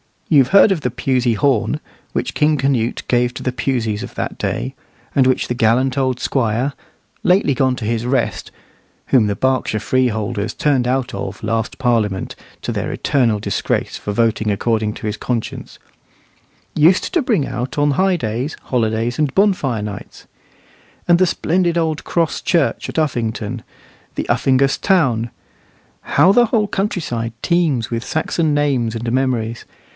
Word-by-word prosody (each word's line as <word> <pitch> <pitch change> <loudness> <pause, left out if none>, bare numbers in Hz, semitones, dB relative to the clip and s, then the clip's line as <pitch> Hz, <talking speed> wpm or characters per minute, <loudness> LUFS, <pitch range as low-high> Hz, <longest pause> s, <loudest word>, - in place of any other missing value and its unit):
You've 140 -6 +5
heard 200 +4 +6
of 180 -5 0
the 125 - 0
Pusey 125 -1 0
horn, 120 +1 +1 0.3
which - - -2
King 150 0 +2
Canute 130 -4 0
gave 120 0 +2
to - - -6
the 130 - 0
Puseys 120 -5 -1
of - - -8
that - - -4
day, - - -3 0.4
and 130 -2 +4
which 130 - +1
the - - -1
gallant 125 +3 +2
old 130 -2 0
squire, 125 +2 0 0.5
lately 180 -6 +3
gone 130 0 +1
to 120 - -6
his 115 +1 -1
rest 125 0 -1 0.6
(whom 120 -5 +4
Berkshire 130 +2 0
freeholders 110 -4 0
turned 135 -5 +1
out 130 0 -1
of 95 +2 -6
last 115 +1 -2
Parliament, 115 -6 0 0.3
to - - -3
their - - -3
eternal 120 -7 +1
disgrace, - - -2
for 105 - -4
voting 110 -1 +1
according 110 +1 0
to - - -8
his 105 0 -2
conscience), 120 -3 -4 1.0
used 170 - +3
to 350 - +3
bring 220 - +1
out 125 +2 -4
on 145 0 +3
high 190 +6 +2
days, 125 +1 -3
holidays, 115 0 -1
and 145 -3 0
bonfire 180 - +2
nights. 105 -1 -8 0.8
And 170 0 +6
the 185 - +4
splendid 170 0 0
old 160 -2 -1
cross 165 -2 0
church 170 -5 +1
at - - -7
Uffington, 115 -8 -2 0.5
the - - -3
Uffingas 135 +1 +2
town. 130 - +2 0.7
How 185 - +4
the 240 +4 +5
whole 215 -2 +1
countryside 155 - -2
teems 155 -10 +1
with 115 0 -2
Saxon 155 0 0
names 130 -6 +1
and 115 +1 -3
memories! 120 -3 -1
130 Hz, 155 wpm, -19 LUFS, 115-150 Hz, 1.0 s, heard